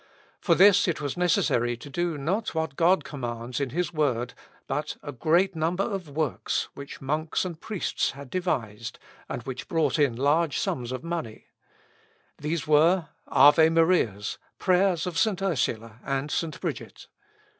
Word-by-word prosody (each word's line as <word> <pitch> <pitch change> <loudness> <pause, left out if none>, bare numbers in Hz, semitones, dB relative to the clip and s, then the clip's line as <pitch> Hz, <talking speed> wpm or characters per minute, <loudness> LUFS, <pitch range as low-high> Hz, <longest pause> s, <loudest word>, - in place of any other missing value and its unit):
For 170 - +3
this 200 +1 +6
it 170 - 0
was 145 -3 -3
necessary 120 -9 +1
to 130 - -11
do 170 +2 -2
not 185 +9 -2
what 160 -4 -2
God 175 +5 +3
commands 120 -3 -5
in 140 -2 -1
his 175 +5 -2
word, 125 -6 0 0.3
but 150 +3 -3
a 145 - -5
great 170 +8 +2
number 165 +4 0
of 195 -7 -4
works 150 -1 -1
which 140 0 -9
monks 155 +6 -1
and 170 -3 -6
priests 210 -5 -1
had 140 -1 -11
devised, 115 - -2 0.3
and 120 - -4
which 130 +1 -6
brought 160 -4 +1
in 140 -5 +3
large 145 +4 +2
sums 125 -1 -2
of 130 - -5
money. 165 -10 -5 0.9
These 155 +2 -2
were, 160 +3 +4 0.2
Ave 145 +4 +6
Marias, 165 - +1 0.2
prayers 185 -2 +2
of 180 -2 -2
St. 215 -4 +2
Ursula, 120 - -1
and 135 +2 -2
St. 165 -2 -2
Bridget. - - -5
155 Hz, 155 wpm, -26 LUFS, 130-175 Hz, 0.9 s, this